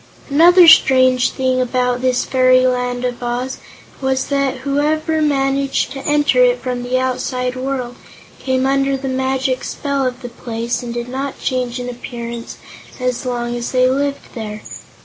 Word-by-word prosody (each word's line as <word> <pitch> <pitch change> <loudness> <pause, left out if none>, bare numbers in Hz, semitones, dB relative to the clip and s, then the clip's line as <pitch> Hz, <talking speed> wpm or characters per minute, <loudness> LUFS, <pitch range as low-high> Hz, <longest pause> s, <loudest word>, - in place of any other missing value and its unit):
Another 345 +4 +7
strange 255 -5 +5
thing 255 -1 0
about 250 0 0
this 255 -1 +1
fairy 255 0 +4
Land 250 0 -1
of 245 0 -4
Oz 245 +2 -3 0.4
was 265 0 -1
that 275 -2 -1
whoever 310 +3 0
managed 275 -2 0
to 270 0 -7
enter 295 +12 +3
it - - +3
from 250 -1 -3
the 245 +1 -1
outside 255 0 -2
world 255 -2 -4 0.4
came 260 0 0
under 275 0 +1
the 270 0 -5
magic 260 0 -1
spell 280 -1 -2
of 250 0 -6
the 245 - -5
place 235 0 -4
and 240 -1 -6
did 240 0 -4
not 265 +2 -5
change 250 -2 -2
in 245 - -5
appearance 235 -1 -7 0.4
as 250 0 -2
long 240 -1 -2
as 240 +1 -4
they 255 0 +4
lived 280 +2 -2
there. 215 -3 -6
255 Hz, 160 wpm, -18 LUFS, 245-275 Hz, 0.4 s, Another